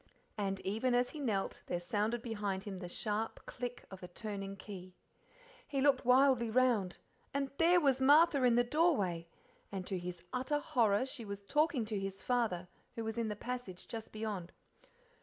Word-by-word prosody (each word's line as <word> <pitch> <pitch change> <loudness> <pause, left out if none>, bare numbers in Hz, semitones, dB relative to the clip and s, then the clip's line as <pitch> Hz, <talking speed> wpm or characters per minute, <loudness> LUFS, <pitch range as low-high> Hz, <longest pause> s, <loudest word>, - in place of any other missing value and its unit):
And 195 -3 -1
even 225 +6 0
as 245 0 +2
he 310 - -7
knelt 215 -8 -1
there 175 - -1
sounded 210 +6 -1
behind 205 -4 -2
him 200 -3 -6
the 180 - -6
sharp 215 +4 -3
click 245 -1 -6
of 190 - -9
a 180 - -7
turning 195 +1 -5
key. 185 -3 -9 0.7
He 275 - -1
looked 270 -2 +3
wildly 255 -2 +5
round, 230 -6 +2 0.4
and 275 -1 0
there 350 +2 +6
was 270 -5 +2
Martha 290 +1 +6
in 245 -2 +5
the 240 - +5
doorway, 240 - +1 0.4
and 190 -2 -4
to 190 -2 -2
his 175 -1 -6
utter 260 +4 0
horror 240 -7 +2
she 260 -3 -4
was 200 -1 -6
talking 295 +1 +2
to 210 -2 -2
his 195 0 -5
father, 225 -8 0 0.3
who 230 - -3
was 225 +1 -3
in 230 - 0
the 210 - -2
passage 240 -5 -5
just 225 -1 -6
beyond. 210 -5 -4
225 Hz, 175 wpm, -34 LUFS, 195-255 Hz, 0.7 s, there